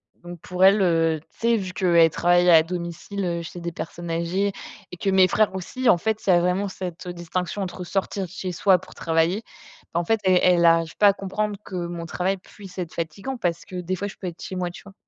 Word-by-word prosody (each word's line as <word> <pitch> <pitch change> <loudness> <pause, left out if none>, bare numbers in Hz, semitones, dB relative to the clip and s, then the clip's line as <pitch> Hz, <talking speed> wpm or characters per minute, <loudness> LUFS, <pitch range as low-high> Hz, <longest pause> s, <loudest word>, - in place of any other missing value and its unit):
Donc 175 -1 -11
pour 180 +1 -2
elle, 195 +1 +6
heu, 165 -2 +2
tu 155 - -27
sais 230 0 +3
vu 185 -2 -5
qu'elle 170 -3 +4
travaille 175 +2 +3
à 160 - +8
domicile, 175 +3 -5
heu, 170 -1 -2
chez 170 +1 -8
des 170 0 -4
personnes 170 +1 -6
âgées 175 +5 0 0.4
et 180 - -8
que 195 - -1
mes 190 -1 +5
frères 210 0 +1
aussi, 245 +7 -1
en - - +6
fait, 220 +4 -1
ça 185 -4 +3
a - - +5
vraiment 180 +3 0
cette, 180 -2 -7
heu, 175 - -4
distinction 175 +3 -3
entre 180 0 -6
sortir 195 +1 -2
de 175 - -12
chez 185 0 -5
soi 185 +2 +4
pour 180 - -14
travailler, 165 +5 +1 0.5
bah, 170 - +1
en 175 - -2
fait, 225 +4 +2
elle 185 -1 +4
elle 175 -2 +4
arrive 165 0 +3
pas 205 - +6
à 200 - +6
comprendre 205 +1 -3
que 190 - -8
mon 170 -1 -4
travail 185 +4 -1
puisse 190 0 -14
être 175 -3 -4
fatigant 195 +11 -4
parce 175 -6 -2
que 185 - -8
des 180 +1 -2
fois 200 +3 -3
je - - -9
peux 185 - -6
être 170 -1 -8
chez 190 - -6
moi, 180 -1 -2
tu 175 - -12
vois? 200 -1 -14
180 Hz, 245 wpm, -24 LUFS, 170-195 Hz, 0.5 s, à